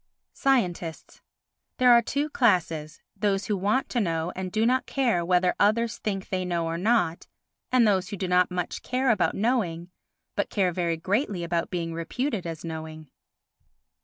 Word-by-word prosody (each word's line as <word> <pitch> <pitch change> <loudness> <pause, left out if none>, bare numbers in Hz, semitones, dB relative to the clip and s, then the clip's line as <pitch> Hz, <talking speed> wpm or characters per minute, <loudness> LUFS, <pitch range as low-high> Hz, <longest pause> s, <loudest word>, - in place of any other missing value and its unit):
Scientists 180 -11 -1 0.6
There 250 -1 +6
are 235 0 +7
two 285 +6 -1
classes, 165 - +1
those 200 -2 0
who 210 - 0
want 205 +7 0
to 245 - 0
know 165 -4 -1
and 185 -1 -4
do 220 +3 +1
not 255 +2 +1
care 240 -10 +1
whether 180 +1 +2
others 215 +2 +2
think 195 -3 -3
they 185 -1 -1
know 170 -2 -1
or 165 0 -2
not, 205 -5 +1 0.4
and 250 -3 +5
those 190 -2 +1
who 200 - -5
do 185 - -2
not 180 0 +3
much 180 -1 -3
care 255 0 +1
about 220 - +1
knowing 185 -7 -1 0.4
but - - -1
care 190 -4 +1
very 170 -1 -1
greatly 195 - -1
about 170 0 -1
being 170 -2 -3
reputed 195 - -3
as 165 0 -6
knowing. 155 -2 -7
185 Hz, 165 wpm, -26 LUFS, 170-230 Hz, 0.6 s, are